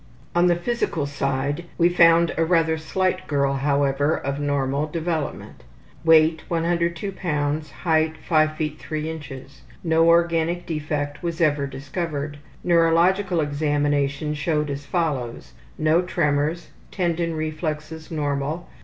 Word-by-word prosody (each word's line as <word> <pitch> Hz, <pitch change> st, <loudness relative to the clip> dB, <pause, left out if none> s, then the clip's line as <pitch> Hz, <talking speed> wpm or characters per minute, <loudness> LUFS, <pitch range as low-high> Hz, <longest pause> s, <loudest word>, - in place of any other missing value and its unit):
On 175 Hz, +1 st, +4 dB
the 175 Hz, -, +4 dB
physical 175 Hz, -5 st, -1 dB
side 140 Hz, +2 st, -2 dB
we 170 Hz, -, +5 dB
found 170 Hz, -1 st, +5 dB
a 165 Hz, -, +2 dB
rather 165 Hz, -1 st, +2 dB
slight 185 Hz, +4 st, -1 dB
girl, 140 Hz, -2 st, +1 dB
however, 140 Hz, +1 st, +1 dB
of 140 Hz, +1 st, -3 dB
normal 145 Hz, 0 st, 0 dB
development. 160 Hz, -1 st, -4 dB, 0.4 s
Weight 160 Hz, 0 st, +5 dB
102 170 Hz, +2 st, -1 dB
lbs.; 150 Hz, -4 st, -2 dB
height 155 Hz, +6 st, 0 dB
5 155 Hz, -1 st, +2 dB
ft. 155 Hz, -1 st, -4 dB
3 155 Hz, 0 st, -4 dB
in. 160 Hz, -1 st, -6 dB, 0.6 s
No 165 Hz, -1 st, +3 dB
organic 170 Hz, 0 st, +2 dB
defect 150 Hz, -3 st, -3 dB
was 170 Hz, -1 st, -3 dB
ever 145 Hz, -4 st, +2 dB
discovered. 145 Hz, +1 st, -4 dB, 0.2 s
Neurological 170 Hz, +2 st, +3 dB
examination 145 Hz, 0 st, 0 dB
showed 150 Hz, -1 st, -1 dB
as 140 Hz, 0 st, -6 dB
follows: 140 Hz, -9 st, -2 dB, 0.2 s
No 155 Hz, +2 st, +3 dB
tremors. 160 Hz, -1 st, -1 dB, 0.2 s
Tendon 170 Hz, -3 st, -1 dB
reflexes 155 Hz, 0 st, -4 dB
normal. 150 Hz, +1 st, -2 dB
155 Hz, 120 wpm, -23 LUFS, 145-170 Hz, 0.6 s, we